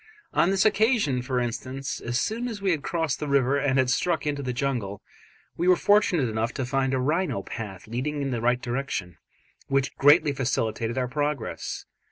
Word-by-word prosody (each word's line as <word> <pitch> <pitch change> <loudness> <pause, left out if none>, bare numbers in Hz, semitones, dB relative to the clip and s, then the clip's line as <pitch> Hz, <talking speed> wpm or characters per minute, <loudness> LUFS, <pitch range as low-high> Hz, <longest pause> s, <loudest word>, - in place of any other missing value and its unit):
On 170 - +3
this 195 +1 +2
occasion, 215 - +3
for 125 0 -1
instance, 130 +3 -4
as 120 +2 -1
soon 235 +3 -1
as 225 -4 -5
we 195 -1 +1
had 160 -4 0
crossed 160 -1 -1
the 150 - -3
river 140 0 +2
and 135 -1 +1
had 130 -1 +3
struck 175 +6 0
into 145 -1 -1
the 130 -2 -2
jungle, 120 -7 -2 0.5
we 175 - 0
were 185 - +7
fortunate 195 - +3
enough 110 +1 -2
to 130 - -2
find 135 +1 0
a - - 0
rhino 145 - 0
path 95 -5 -7
leading 130 +7 -3
in 135 - -2
the 120 -2 -2
right 125 +1 +2
direction, 120 - -3 0.5
which 135 -1 0
greatly 145 +1 +5
facilitated 115 -3 -1
our 125 -1 0
progress. 145 0 -3
135 Hz, 190 wpm, -26 LUFS, 125-150 Hz, 0.5 s, were